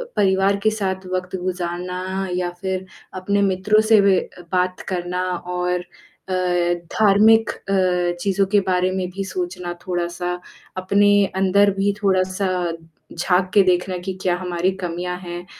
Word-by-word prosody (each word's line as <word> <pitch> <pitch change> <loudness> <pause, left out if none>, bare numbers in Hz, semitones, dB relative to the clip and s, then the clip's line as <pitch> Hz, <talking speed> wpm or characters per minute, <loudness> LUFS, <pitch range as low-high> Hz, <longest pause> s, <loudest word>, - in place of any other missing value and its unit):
परिवार 195 0 +3
के 215 - +5
साथ 190 -3 -3
वक़्त 185 0 -3
गुज़ारना 180 +1 -3
या 180 -1 -1
फिर 190 -1 -2 0.3
अपने 200 +2 0
मित्रों 200 +3 +3
से 220 -2 +7
ब 190 -2 0
बात 180 0 0
करना 180 0 -2 0.3
और 180 0 -1
अ, 185 +1 -12
धार्मिक 185 +5 +3
अ, 180 -2 0
चीज़ों 195 0 +1
के 205 +1 +3
बारे 180 +1 +2
में 185 -1 -2
भी 195 - -2
सोचना 180 -1 -4
थोड़ा-सा, 175 0 -2 0.4
अपने 200 +2 +4
अंदर 200 +1 +4
भी 200 +1 +1
थोड़ा-सा 185 0 +1 0.7
झाँक 180 +1 +1
के 205 - +7
देखना 180 0 +1
कि 185 +2 -5
क्या 180 -3 +1
हमारी 180 0 -1
कमियाँ 180 +1 -3
हैं 175 0 -7
185 Hz, 140 wpm, -21 LUFS, 180-195 Hz, 0.7 s, से